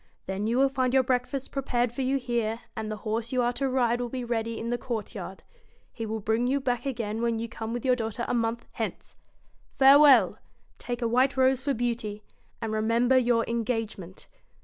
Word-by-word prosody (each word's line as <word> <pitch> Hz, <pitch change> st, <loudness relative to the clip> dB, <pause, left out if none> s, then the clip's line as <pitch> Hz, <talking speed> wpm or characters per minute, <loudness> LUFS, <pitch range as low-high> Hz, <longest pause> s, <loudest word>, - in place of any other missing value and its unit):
Then 195 Hz, +3 st, -2 dB
you 235 Hz, +2 st, +1 dB
will 270 Hz, +1 st, +5 dB
find 260 Hz, -1 st, 0 dB
your 265 Hz, -, +5 dB
breakfast 255 Hz, +2 st, -1 dB
prepared 245 Hz, -3 st, 0 dB
for 240 Hz, -, -4 dB
you 265 Hz, +1 st, +1 dB
here, 235 Hz, -3 st, -2 dB
and 220 Hz, -1 st, -4 dB
the 215 Hz, -, -3 dB
horse 225 Hz, +2 st, -2 dB
you 255 Hz, -1 st, +1 dB
are 240 Hz, +1 st, +1 dB
to 270 Hz, +2 st, -1 dB
ride 245 Hz, -2 st, +1 dB
will 245 Hz, -, -3 dB
be 255 Hz, 0 st, -4 dB
ready 230 Hz, -1 st, -2 dB
in 230 Hz, +1 st, -4 dB
the 240 Hz, -, 0 dB
court 230 Hz, -4 st, -4 dB
yard. -, -, -8 dB, 0.5 s
He 225 Hz, -1 st, -5 dB
will 220 Hz, +1 st, -3 dB
bring 220 Hz, +4 st, 0 dB
you 275 Hz, +2 st, +1 dB
back 260 Hz, 0 st, -2 dB
again 225 Hz, -4 st, -3 dB
when 235 Hz, -1 st, +1 dB
you 230 Hz, +1 st, -3 dB
come 225 Hz, 0 st, -6 dB
with 240 Hz, +1 st, -4 dB
your 255 Hz, -1 st, +4 dB
daughter 225 Hz, 0 st, -3 dB
a -, -, -1 dB
month 230 Hz, 0 st, -1 dB
hence. -, -, -5 dB, 0.6 s
Fare 275 Hz, +1 st, +8 dB
well! 240 Hz, -9 st, +6 dB, 0.4 s
take 240 Hz, 0 st, -4 dB
a -, -, +2 dB
white 255 Hz, +4 st, +2 dB
rose 260 Hz, 0 st, +3 dB
for 280 Hz, -1 st, 0 dB
Beauty; 225 Hz, -3 st, -3 dB, 0.4 s
and 220 Hz, -, -2 dB
remember 230 Hz, +4 st, +2 dB
your 240 Hz, -2 st, +3 dB
engagement.' 225 Hz, -6 st, -3 dB
240 Hz, 210 wpm, -27 LUFS, 225-255 Hz, 0.6 s, Fare